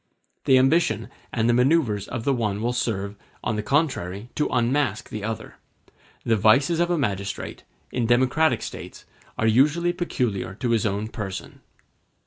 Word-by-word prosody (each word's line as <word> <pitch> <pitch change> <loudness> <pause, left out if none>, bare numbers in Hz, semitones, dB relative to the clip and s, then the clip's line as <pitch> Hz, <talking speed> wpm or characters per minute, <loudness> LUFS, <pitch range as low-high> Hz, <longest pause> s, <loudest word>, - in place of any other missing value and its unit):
The 130 - +6
ambition 130 - +2 0.2
and 115 -1 +1
the 120 - +4
manoeuvres 125 - +2
of 120 -2 -4
the 140 - +2
one 105 -5 -1
will 120 +3 -1
serve, 100 -5 -2 0.3
on 110 - -1
the 105 - -1
contrary, 110 - -1
to 150 - 0
unmask 130 +3 0
the 105 - -6
other. 110 0 -5 0.7
The 115 - +2
vices 140 - +4
of 175 0 +2
a 175 - +1
magistrate, 100 -7 -3 0.3
in 120 -2 0
democratic 130 +6 +3
states, - - -8 0.3
are 110 - 0
usually 150 +10 +3
peculiar 125 - -2
to 120 +3 -2
his 115 -1 +2
own 100 +1 -2
person. 100 -4 -6
120 Hz, 155 wpm, -24 LUFS, 105-140 Hz, 0.7 s, The